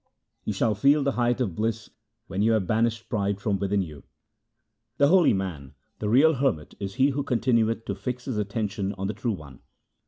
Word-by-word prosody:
You - - -1
shall 105 +2 +1
feel 140 +8 +3
the 140 - +1
height 120 -1 +1
of 110 -9 -1
bliss 110 +4 -2 0.3
when 95 -3 -3
you 115 +2 +4
have 110 -4 +1
banished 115 +3 0
pride 100 -2 -1
from 100 -1 -1
within 100 0 +1
you. 75 -5 -10 1.0
The 140 0 +4
holy 180 -1 +5
man, 90 -9 -4 0.2
the 105 - -2
real 145 +8 +5
hermit, 125 - -1
is 100 -1 -5
he 135 +2 +4
who 140 +1 -1
continueth 115 -4 +1
to - - -2
fix 125 -1 -5
his 125 -6 -2
attention 100 -2 -2
on 95 0 -5
the 105 - -2
True 110 +2 -2
One. 70 -8 -10
110 Hz, 195 wpm, -26 LUFS, 100-125 Hz, 1.0 s, holy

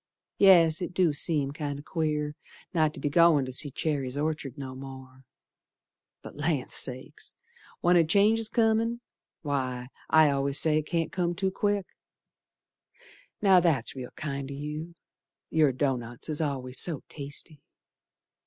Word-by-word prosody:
Yes, 170 -4 +6
it 180 0 -5
do 180 -5 +3
seem 145 -2 0
kinder 145 -2 -5
queer 150 -2 -2 0.4
Not 155 -3 +2
to - - -8
be 140 - -2
goin' 155 -2 +4
to 130 - -6
see 145 +3 0
Cherry's 140 -2 -2
Orchard 150 -3 -3
no 135 -2 -6
more, 130 0 -11 1.0
But - - -10
Land 150 -3 -1
Sakes! 130 0 -1 0.5
When 175 +1 +4
a 170 - +6
change's 210 +6 +3
comin', 230 +1 +1 0.4
Why, 130 -4 -3 0.2
I 160 -1 +6
al'ays 140 0 0
say 155 +2 +4
it 155 - -6
can't 165 -2 -1
come 175 -1 -1
too 190 +1 -1
quick. 205 0 0 1.6
Now, 190 -2 +7
that's 155 -10 0
real 125 -2 -7
kind 140 -3 -5
o' 140 - -6
you, 150 +4 -6 0.6
Your 155 -3 +4
doughnuts 125 -2 -3
is 155 0 0
always 130 -4 -2
so 160 -6 -1
tasty. 145 +1 -5
150 Hz, 145 wpm, -28 LUFS, 135-170 Hz, 1.6 s, Now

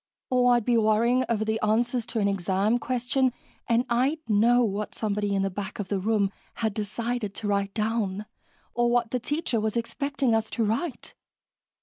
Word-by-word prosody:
Or 245 -1 +4
I'd 240 -3 0
be 240 -2 +3
worrying 230 +4 +3
over 220 -2 0
the 220 0 0
answers 235 +2 +1
to 230 - -4
an 200 - +2
exam 195 +4 +1
question, 255 +1 0 0.4
and 235 +2 +3
I'd 255 +6 +1
know 235 +3 +4
what 210 -1 -2
somebody 205 -2 -1
in 195 - +1
the 195 - -1
back 200 +2 -5
of 200 -3 -5
the 200 - 0
room 205 0 +1 0.2
had 220 -2 -1
decided 215 +1 -3
to 215 - -4
write 200 -1 0
down, 215 -2 -1 0.5
or 240 0 +2
what 240 -1 +1
the 250 - 0
teacher 275 -1 -1
was 220 +1 -1
expecting 270 +1 -1
us 220 -1 +1
to 230 - -1
write. 235 +6 -2
225 Hz, 185 wpm, -26 LUFS, 205-245 Hz, 0.5 s, Or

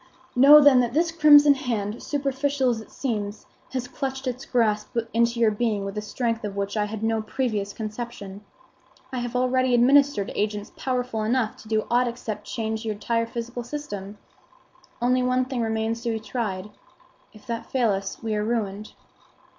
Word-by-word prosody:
Know, 280 +4 +9
then, 285 -3 +7
that 240 +1 0
this 330 +1 +2
crimson 295 -3 +7
hand, 230 -5 -3
superficial 275 -2 0
as 225 -2 -3
it - - -14
seems, 210 -5 -4 0.2
has 255 -1 -3
clutched 265 0 -4
its 255 +1 -4
grasp 220 -1 0 0.2
into 235 +1 +2
your 225 -2 +4
being 210 -2 -1
with 195 +1 -5
a 210 - -2
strength 230 +1 -2
of 205 -2 -4
which 200 +1 -3
I 210 -1 +1
had 215 +1 -6
no 225 0 +1
previous 215 -3 -2
conception. 215 -2 -7 0.7
I 255 - -1
have 245 0 -4
already 255 0 +2
administered 265 -3 +4
agents 210 0 -2
powerful 250 -3 -2
enough 225 +1 0
to - - -14
do 215 -1 0
aught 245 +1 +3
except 235 -3 -5
to - - -7
change 220 -1 -3
your 220 -2 -2
entire 230 +2 -1
physical 235 +1 -5
system. 210 -7 -6 0.9
Only 250 +1 +3
one 255 0 +1
thing 255 -2 -3
remains 225 0 -1
to 235 - -2
be 220 - -2
tried. 210 -3 -4 0.6
If 215 - -17
that 230 -1 -4
fail 245 -5 +2
us 195 +2 -4
we 220 -1 -1
are 210 0 0
ruined." 215 -2 -3
235 Hz, 180 wpm, -25 LUFS, 215-255 Hz, 0.9 s, Know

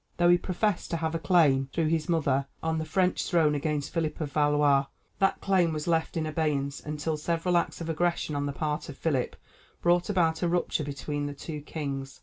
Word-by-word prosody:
Though 175 0 +4
he 175 - +7
professed 190 +2 -1
to 170 - -1
have 160 0 -2
a 165 - -1
claim, 145 -7 +3
through 165 -2 0
his 160 -1 0
mother, 140 -5 +1 0.2
on 160 0 0
the 160 - -3
French 180 +3 +1
throne 160 -4 +3
against 150 0 -2
Philip 165 -3 -1
of 150 -3 -3
Valois, 145 -2 +3 0.3
that 195 - +2
claim 185 -4 +3
was 150 -1 -3
left 165 0 0
in 160 - 0
abeyance 150 -3 -1
until 150 +1 -3
several 170 +3 0
acts 170 - 0
of 165 - -4
aggression 170 -1 0
on 145 0 -1
the - - -2
part 150 +2 -3
of 140 - -8
Philip 140 -6 -1 0.4
brought 175 +1 +2
about 165 -5 +2
a 175 - +2
rupture 170 -2 0
between 145 +1 -3
the 145 - -6
two 150 +1 -6
kings. 140 -3 -5
155 Hz, 205 wpm, -28 LUFS, 145-170 Hz, 0.4 s, he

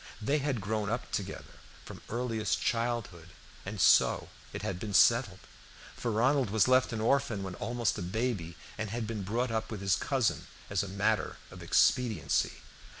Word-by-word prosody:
They 140 +7 +1
had 135 -5 -1
grown 105 +1 -2
up - - -3
together - - -5 0.3
from - - -10
earliest 115 -3 -1
childhood, 115 -8 -2 0.4
and - - -5
so - - +4 0.2
it - - -6
had 90 -1 -3
been 105 -1 -4
settled; 115 -2 +4 0.5
for 120 - -3
Ronald 125 +3 +2
was 110 +2 +3
left 130 0 +4
an 115 - -3
orphan 115 -4 +1
when 95 -2 -5
almost 120 +3 -1
a - - -4
baby, 95 -3 -2 0.2
and 110 -1 -2
had 115 +2 -3
been 110 -1 -4
brought 115 +6 -1
up 110 0 -2
with 110 - -5
his 95 -2 +2
cousin 130 -5 0 0.2
as 100 - +1
a 100 - -4
matter 100 +1 0
of - - -11
expediency. 125 -4 +2
110 Hz, 170 wpm, -30 LUFS, 100-120 Hz, 0.5 s, so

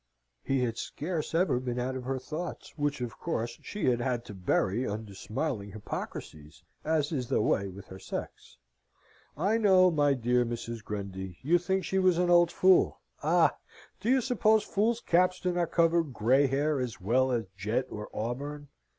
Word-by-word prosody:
He 135 -1 0
had 115 -2 -2
scarce 160 0 -4
ever 170 -7 +2
been 125 -1 -3
out 125 +1 -2
of 130 -1 -5
her 135 +1 -1
thoughts, 155 +6 -6
which 145 -3 -1
of 120 -1 -5
course 120 -8 -3
she 210 - -4
had 120 -2 +2
had 120 -1 -1
to - - -9
bury 95 +4 0
under 105 0 -5
smiling 105 +1 -4
hypocrisies, 80 -6 -7 0.2
as 155 -1 +1
is 130 -6 -2
the - - +1
way 100 -2 +1
with 95 0 -10
her 95 - -9
sex. - - -7 0.8
I 200 +8 +2
know, 185 -4 +5
my 145 -3 +3
dear 125 0 +2
Mrs. 115 -1 -5
Grundy, 95 -3 -6
you 170 +6 +4
think 190 +2 -1
she 190 - 0
was 185 -2 +4
an 175 0 +2
old 175 -1 +5
fool? 185 0 +4 0.2
Ah! - - +3 0.4
do 230 - -2
you 260 0 +4
suppose 220 -3 +3
fools' 225 +3 0
caps 180 +1 +2
do 180 - 0
not 175 -2 0
cover 170 0 +4
grey 135 -1 +2
hair, 145 +2 +1
as 125 -3 -4
well 130 +7 +2
as 115 -3 0
jet 110 +7 -1
or 105 0 -6
auburn? 140 +6 -4
130 Hz, 180 wpm, -29 LUFS, 115-175 Hz, 0.8 s, know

